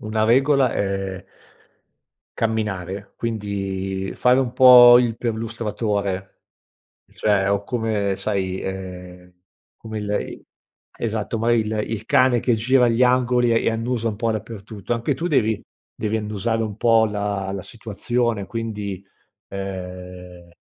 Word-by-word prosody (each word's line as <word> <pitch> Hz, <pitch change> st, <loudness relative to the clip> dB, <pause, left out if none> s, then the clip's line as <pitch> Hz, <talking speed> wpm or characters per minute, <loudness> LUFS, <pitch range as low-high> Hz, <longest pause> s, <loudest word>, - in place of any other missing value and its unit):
una 110 Hz, 0 st, -1 dB
regola 135 Hz, +2 st, +3 dB
è 95 Hz, -1 st, -3 dB, 1.1 s
camminare, 100 Hz, -4 st, -3 dB
quindi 95 Hz, -3 st, -3 dB
fare 125 Hz, +1 st, +3 dB
un 130 Hz, -3 st, 0 dB
po' 125 Hz, -1 st, +9 dB
il 120 Hz, -2 st, -1 dB
perlustratore 110 Hz, -4 st, -3 dB, 0.7 s
cioè 100 Hz, -2 st, 0 dB
o 100 Hz, 0 st, +1 dB
come 110 Hz, -4 st, -1 dB
sai, 95 Hz, -3 st, -2 dB
ehm, 90 Hz, -1 st, -7 dB, 0.4 s
come 110 Hz, -1 st, -7 dB
il 105 Hz, -1 st, -5 dB
i -, -, -8 dB, 0.5 s
esatto 110 Hz, 0 st, -2 dB
mari 115 Hz, +1 st, +2 dB
il 110 Hz, 0 st, -2 dB
il 110 Hz, -1 st, -4 dB
cane 130 Hz, -2 st, +4 dB
che 120 Hz, -1 st, +1 dB
gira 125 Hz, +2 st, +3 dB
gli 115 Hz, +2 st, +3 dB
angoli 125 Hz, -1 st, +3 dB
e 115 Hz, 0 st, +2 dB
annusa 115 Hz, +1 st, -2 dB
un 105 Hz, -, -4 dB
po' 115 Hz, +1 st, 0 dB
dappertutto, 110 Hz, -1 st, -6 dB
anche 120 Hz, +5 st, 0 dB
tu 165 Hz, +7 st, -3 dB
devi 110 Hz, -, +1 dB, 0.3 s
devi 110 Hz, 0 st, -2 dB
annusare 110 Hz, +1 st, -2 dB
un 105 Hz, -2 st, -6 dB
po' 115 Hz, 0 st, +4 dB
la 100 Hz, -2 st, -3 dB
la 95 Hz, -2 st, -5 dB
situazione, 115 Hz, -1 st, -2 dB
quindi, 105 Hz, -3 st, -4 dB, 0.5 s
ehm, 90 Hz, -2 st, -8 dB
110 Hz, 130 wpm, -22 LUFS, 100-115 Hz, 1.1 s, po